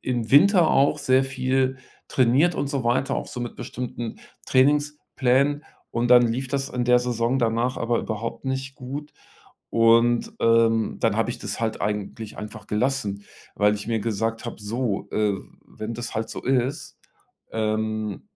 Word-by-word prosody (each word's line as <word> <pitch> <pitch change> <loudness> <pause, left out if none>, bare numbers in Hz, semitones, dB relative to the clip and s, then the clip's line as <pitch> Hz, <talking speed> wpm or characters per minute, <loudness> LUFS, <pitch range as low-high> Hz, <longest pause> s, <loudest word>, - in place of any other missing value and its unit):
im 120 -3 -2
Winter 175 +3 +6
auch 140 +1 +3
sehr 130 +1 +3
viel 130 0 0 0.3
trainiert 135 +7 +3
und 140 - -2
so 140 -4 -2
weiter, 130 +3 +1
auch - - -4
so 125 - -7
mit 120 -1 -5
bestimmten 120 -2 -5 0.3
Trainingsplänen. 145 0 +2 0.3
Und 120 +1 -1
dann 125 0 +8
lief 130 +3 -2
das 135 0 -2
in 125 -1 -2
der 125 0 +5
Saison 120 +1 0
danach 120 +1 0
aber 115 0 0
überhaupt 110 +4 -4
nicht 135 0 -3
gut. 140 +4 -7 0.6
Und, 115 +1 +4
ähm, 115 -1 +3
dann - - +1
habe - - +1
ich - - -6
das - - -5
halt 110 -3 -2
eigentlich 105 +1 -4
einfach 105 +1 -8
gelassen, 105 -3 -1 0.3
weil 105 0 +3
ich 105 +1 -6
mir 115 -1 +1
gesagt 115 +1 -2
habe: - - -5
„So, 110 0 -2
äh, 105 -1 +1 0.3
wenn 110 +2 -6
das 120 +1 -6
halt 110 0 -2
so - - -6
ist, 130 +2 -1 0.5
ähm 110 -1 -2
120 Hz, 160 wpm, -24 LUFS, 110-130 Hz, 0.6 s, dann